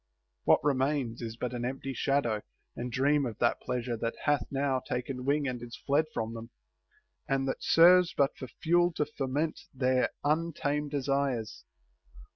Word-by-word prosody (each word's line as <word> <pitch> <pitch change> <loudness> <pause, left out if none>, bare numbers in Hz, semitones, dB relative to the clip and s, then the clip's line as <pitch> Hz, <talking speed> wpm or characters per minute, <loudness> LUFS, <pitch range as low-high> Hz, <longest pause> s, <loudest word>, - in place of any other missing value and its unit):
What - - +5
remains 135 -4 0
is 115 -1 -5
but 125 +1 -3
an 120 -1 -3
empty 135 +2 -3
shadow 120 -5 0 0.3
and 125 +1 -4
dream 140 +3 +2
of 115 -5 -4
that 120 - +1
pleasure 125 -1 -2
that 115 +1 -2
hath 145 -1 +1
now 135 -1 0
taken 125 +1 -4
wing 145 +1 +1
and 125 -2 -3
is 120 0 -8
fled 145 +3 +3
from 115 -3 -3
them, 115 0 -8 0.8
and 135 0 +1
that 130 - -2
serves 175 +1 +6
but 140 0 +1
for 130 - -7
fuel 175 +5 +2
to 150 - 0
foment 150 +2 -2 0.2
their 130 -1 +2
untamed 150 -1 0
desires. 135 -5 -1
135 Hz, 160 wpm, -30 LUFS, 125-145 Hz, 0.8 s, serves